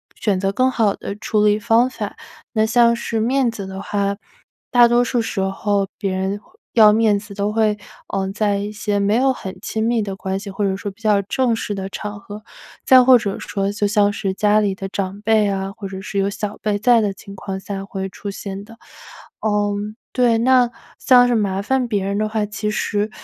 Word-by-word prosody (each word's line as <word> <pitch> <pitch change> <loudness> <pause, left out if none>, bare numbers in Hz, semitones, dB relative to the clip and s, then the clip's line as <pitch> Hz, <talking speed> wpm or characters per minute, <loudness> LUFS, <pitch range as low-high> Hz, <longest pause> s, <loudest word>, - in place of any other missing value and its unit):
选 200 -4 0
择 195 +1 0
更 255 +6 +2
好 220 -5 +2
的 200 - -6
处 210 0 0
理 210 0 +4
方 235 +2 +3
法。 - - -6 0.4
那 215 -2 +2
像 235 +1 +4
是 230 -1 -3
面 250 +2 +2
子 205 -3 -7
的 190 0 -7
话， 200 0 -1 0.6
大 240 -1 +7
多 240 +1 +3
数 245 0 0
时 225 -2 -3
候 195 +1 0
别 195 -1 -2
人 190 +2 -2 0.3
要 215 -2 +7
面 215 -2 +3
子 205 0 -11
都 200 +1 -1
会， 215 -1 +2 0.4
呃， 190 -1 -1
在 205 -1 +1
一 205 +1 -4
些 205 -1 -2
没 200 +2 +2
有 265 +3 +3
很 190 -6 -8
亲 220 0 -2
密 230 0 +1
的 195 -2 -4
关 190 0 -3
系， 200 0 -8
或 205 +2 -3
者 190 -1 0
说 200 0 -5
比 205 +4 -23
较 210 -2 +3
正 240 +3 0
式 210 -2 -4
的 190 0 -5
场 205 +1 -6
合， 210 +1 -10 0.4
再 260 -2 +7
或 255 0 +7
者 205 -4 -3
说 200 0 -2
就 205 0 0
像 205 -1 +3
是 195 -1 -2
家 210 +1 +3
里 200 -2 0
的 195 0 -5
长 195 +1 -4
辈 215 -1 +3
啊， 195 0 -2
或 200 -4 -6
者 190 0 -7
是 200 0 -3
有 195 - +1
小 205 0 -4
辈 210 -1 0
在 235 +2 +4
的 205 -2 0
情 200 +1 -12
况 190 0 -5
下 195 0 -5
会 195 -1 -4
出 205 - -7
现 195 0 -7
的。 230 +2 -15 0.6
嗯， 205 0 -1 0.2
对。 240 -3 +3
那 250 0 +4 0.3
像 245 -2 +6
是 245 - +1
麻 195 -2 0
烦 260 +2 0
别 205 -4 -1
人 200 +1 -1
的 215 - 0
话， 215 -1 -1
其 210 +1 -3
实， 210 0 -1
210 Hz, 235 characters per minute, -20 LUFS, 200-225 Hz, 0.6 s, 大